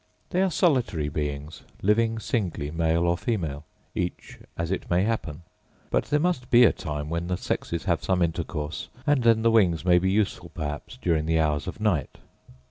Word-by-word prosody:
They 180 Hz, -, +2 dB
are 190 Hz, -, +3 dB
solitary 125 Hz, -, +1 dB
beings, 75 Hz, 0 st, -4 dB, 0.2 s
living 115 Hz, +3 st, +2 dB
singly 90 Hz, -, -2 dB
male 80 Hz, +1 st, +1 dB
or 85 Hz, 0 st, +3 dB
female, 80 Hz, -8 st, -3 dB, 0.3 s
each 90 Hz, 0 st, -4 dB, 0.2 s
as 85 Hz, +1 st, -2 dB
it 95 Hz, -, -3 dB
may 90 Hz, +2 st, +3 dB
happen: 90 Hz, -8 st, -2 dB, 0.5 s
hut -, -, +1 dB
there 150 Hz, -, +1 dB
must 150 Hz, -7 st, 0 dB
be 120 Hz, 0 st, +7 dB
a 115 Hz, -, +6 dB
time 75 Hz, -1 st, -4 dB
when 85 Hz, +2 st, -2 dB
the 90 Hz, 0 st, -1 dB
sexes 85 Hz, -1 st, -3 dB
have 85 Hz, -4 st, 0 dB
some 95 Hz, -2 st, +2 dB
intercourse, 80 Hz, -1 st, -3 dB, 0.2 s
and 145 Hz, -3 st, +3 dB
then 115 Hz, -1 st, +4 dB
the 115 Hz, -, +4 dB
wings 90 Hz, -7 st, +3 dB
may 90 Hz, -1 st, +5 dB
be 95 Hz, +2 st, +1 dB
useful 100 Hz, +1 st, 0 dB
perhaps 75 Hz, +10 st, -5 dB
during 80 Hz, -6 st, 0 dB
the 80 Hz, 0 st, +2 dB
hours 75 Hz, -2 st, 0 dB
of -, -, -6 dB
night. 105 Hz, -9 st, 0 dB
90 Hz, 185 wpm, -26 LUFS, 80-110 Hz, 0.5 s, be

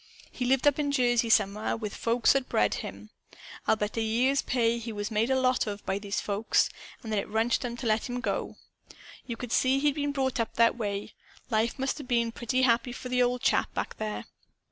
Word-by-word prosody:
He 250 Hz, -, -3 dB
lived 260 Hz, +2 st, +2 dB
up 290 Hz, 0 st, +4 dB
in 285 Hz, -1 st, 0 dB
Jersey, 240 Hz, -3 st, +2 dB
somewhere. 210 Hz, 0 st, +2 dB
With 215 Hz, -3 st, -5 dB
folks 230 Hz, +1 st, +3 dB
that -, -, +3 dB
had -, -, -31 dB
bred 105 Hz, -1 st, +2 dB
him. 100 Hz, +2 st, -7 dB, 0.6 s
I'll -, -, +5 dB
bet 210 Hz, -1 st, -3 dB
a -, -, +1 dB
year's 245 Hz, +5 st, +2 dB
pay 235 Hz, -2 st, +1 dB
he 230 Hz, 0 st, -6 dB
was 205 Hz, +1 st, -4 dB
made 220 Hz, +3 st, +1 dB
a 265 Hz, 0 st, +3 dB
lot 255 Hz, -2 st, +2 dB
of 205 Hz, 0 st, -5 dB
by 195 Hz, -, -1 dB
those 205 Hz, 0 st, -3 dB
folks; 205 Hz, +2 st, +1 dB, 0.3 s
and 220 Hz, -, -6 dB
that 215 Hz, -, +1 dB
it -, -, -4 dB
wrenched 225 Hz, +4 st, +1 dB
'em 240 Hz, -1 st, -4 dB
to 245 Hz, -, -6 dB
let 220 Hz, +2 st, +1 dB
him 245 Hz, 0 st, -3 dB
go. 245 Hz, -, -2 dB, 0.7 s
You 235 Hz, -2 st, -4 dB
could 245 Hz, -1 st, -6 dB
see 260 Hz, +1 st, +3 dB
he'd 290 Hz, +1 st, +2 dB
been 290 Hz, 0 st, -1 dB
brought 265 Hz, -3 st, -1 dB
up 230 Hz, -, -2 dB
that 230 Hz, 0 st, +4 dB
way. 205 Hz, -3 st, -4 dB, 0.4 s
Life 225 Hz, +1 st, +1 dB
must 270 Hz, +3 st, -2 dB
'a' -, -, -6 dB
been 235 Hz, -2 st, +1 dB
pretty 250 Hz, +3 st, -1 dB
happy 240 Hz, 0 st, +2 dB
for 250 Hz, -, -7 dB
the 250 Hz, 0 st, +2 dB
old 245 Hz, 0 st, +1 dB
chap, -, -, +1 dB
back -, -, -3 dB
there. 215 Hz, -1 st, -4 dB
235 Hz, 230 wpm, -28 LUFS, 215-255 Hz, 0.7 s, I'll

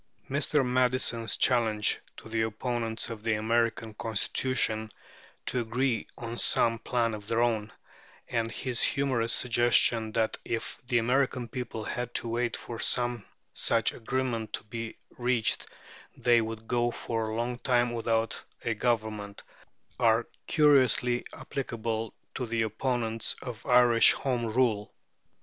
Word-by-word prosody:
Mr. 140 Hz, 0 st, +2 dB
Madison's 125 Hz, -3 st, +1 dB
challenge 110 Hz, -4 st, +2 dB, 0.2 s
to -, -, -11 dB
the 110 Hz, 0 st, -1 dB
opponents 115 Hz, +1 st, -2 dB
of 110 Hz, -2 st, -7 dB
the 110 Hz, 0 st, +1 dB
American 115 Hz, 0 st, 0 dB
Constitution 110 Hz, 0 st, 0 dB, 0.6 s
to 125 Hz, -, 0 dB
agree 120 Hz, +1 st, -1 dB
on 120 Hz, 0 st, -5 dB
some 115 Hz, -1 st, +3 dB
plan 115 Hz, -2 st, 0 dB
of 105 Hz, -1 st, -7 dB
their 115 Hz, +1 st, +1 dB
own, 110 Hz, -3 st, 0 dB, 0.6 s
and 115 Hz, -1 st, -1 dB
his 125 Hz, +1 st, -2 dB
humorous 130 Hz, -5 st, +1 dB
suggestion 120 Hz, -2 st, +3 dB
that 110 Hz, -1 st, 0 dB
if 115 Hz, -, -4 dB
the 120 Hz, -, +2 dB
American 125 Hz, +1 st, +1 dB
people 120 Hz, -4 st, -5 dB
had 120 Hz, +2 st, -4 dB
to -, -, 0 dB
wait 120 Hz, +1 st, -1 dB
for 115 Hz, -1 st, -7 dB
some 120 Hz, -3 st, +1 dB, 0.3 s
such -, -, +2 dB
agreement 120 Hz, -2 st, -2 dB
to -, -, -3 dB
be 115 Hz, +1 st, -6 dB, 0.2 s
reached 120 Hz, -2 st, +1 dB, 0.5 s
they 120 Hz, -1 st, +4 dB
would 110 Hz, 0 st, -6 dB
go 120 Hz, 0 st, +1 dB
for 115 Hz, -1 st, -3 dB
a 110 Hz, 0 st, -3 dB
long 120 Hz, +1 st, -2 dB
time 120 Hz, -2 st, +2 dB
without 115 Hz, -1 st, -1 dB, 0.2 s
a 115 Hz, -, +1 dB
government, 110 Hz, -3 st, -2 dB, 0.6 s
are 115 Hz, -1 st, +4 dB, 0.2 s
curiously 130 Hz, -5 st, +4 dB
applicable 115 Hz, -4 st, -4 dB, 0.2 s
to 125 Hz, -, -3 dB
the 115 Hz, 0 st, 0 dB
opponents 115 Hz, 0 st, -1 dB
of 120 Hz, -3 st, -7 dB
Irish 120 Hz, -2 st, +6 dB
Home 125 Hz, -4 st, -1 dB
Rule. 110 Hz, -3 st, +1 dB
115 Hz, 135 wpm, -29 LUFS, 110-125 Hz, 0.6 s, Irish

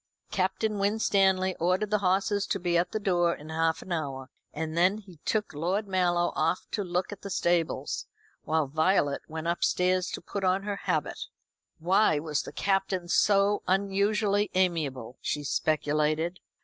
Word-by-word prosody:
Captain 195 Hz, +3 st, 0 dB
Winstanley 195 Hz, -2 st, +2 dB
ordered 185 Hz, +5 st, 0 dB
the 210 Hz, -, +3 dB
horses 195 Hz, +2 st, +1 dB
to 195 Hz, -, -1 dB
be 175 Hz, -1 st, 0 dB
at 170 Hz, +1 st, +2 dB
the 215 Hz, -, -2 dB
door 175 Hz, -4 st, +2 dB
in 150 Hz, +2 st, -12 dB
half 160 Hz, 0 st, 0 dB
an 185 Hz, -, -11 dB
hour: 135 Hz, -5 st, -3 dB, 0.2 s
and 160 Hz, +1 st, -4 dB
then 180 Hz, +4 st, +3 dB
he 190 Hz, -5 st, -13 dB
took 215 Hz, -5 st, -1 dB
Lord 180 Hz, +8 st, -1 dB
Mallow 175 Hz, -2 st, +1 dB
off 165 Hz, +3 st, 0 dB
to 205 Hz, -, -1 dB
look 180 Hz, +1 st, -2 dB
at 205 Hz, -, -8 dB
the 200 Hz, -, -7 dB
stables, 175 Hz, -3 st, 0 dB, 0.3 s
while 160 Hz, -1 st, 0 dB
Violet 150 Hz, 0 st, +1 dB
went 160 Hz, 0 st, -6 dB
upstairs 180 Hz, +1 st, +1 dB
to -, -, -3 dB
put 200 Hz, -, -5 dB
on 185 Hz, +1 st, +2 dB
her 200 Hz, -1 st, -3 dB
habit. -, -, -1 dB, 0.5 s
Why 180 Hz, 0 st, +3 dB
was 150 Hz, -1 st, -1 dB
the -, -, -9 dB
Captain 195 Hz, -2 st, 0 dB
so 200 Hz, +1 st, +3 dB
unusually 200 Hz, +2 st, +1 dB
amiable? 150 Hz, -10 st, -1 dB
she 150 Hz, -, -2 dB
speculated. 155 Hz, +3 st, 0 dB
180 Hz, 160 wpm, -28 LUFS, 160-195 Hz, 0.5 s, the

